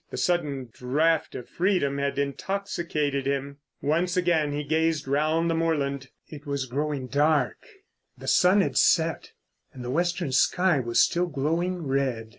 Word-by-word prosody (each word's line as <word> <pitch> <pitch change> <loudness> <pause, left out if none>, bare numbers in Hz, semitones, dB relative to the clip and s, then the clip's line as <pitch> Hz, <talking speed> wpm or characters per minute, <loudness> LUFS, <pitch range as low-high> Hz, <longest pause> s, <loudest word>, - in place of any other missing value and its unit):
The - - -7
sudden 145 -8 -1
draught 155 +6 0
of 125 - -7
freedom 175 -7 0
had 140 0 -2
intoxicated 150 -2 -2
him. 140 0 -2 0.3
Once 170 +5 0
again 165 -5 +2
he 145 +1 -3
gazed 160 0 0
round 155 +4 +1
the 165 - +1
moorland. 140 -5 -1 0.2
It 150 -2 -11
was 140 -2 -2
growing 140 +1 -3
dark, 145 -1 +1 0.6
the - - -10
sun 185 +3 +4
had - - -1
set, 165 -1 +2 0.4
and 125 -1 -9
the 125 - -3
western 175 0 -1
sky 175 +4 +3
was 120 -2 0
still 175 +1 +3
glowing 165 +4 -2
red. 135 -5 -1
150 Hz, 150 wpm, -26 LUFS, 140-170 Hz, 0.6 s, sun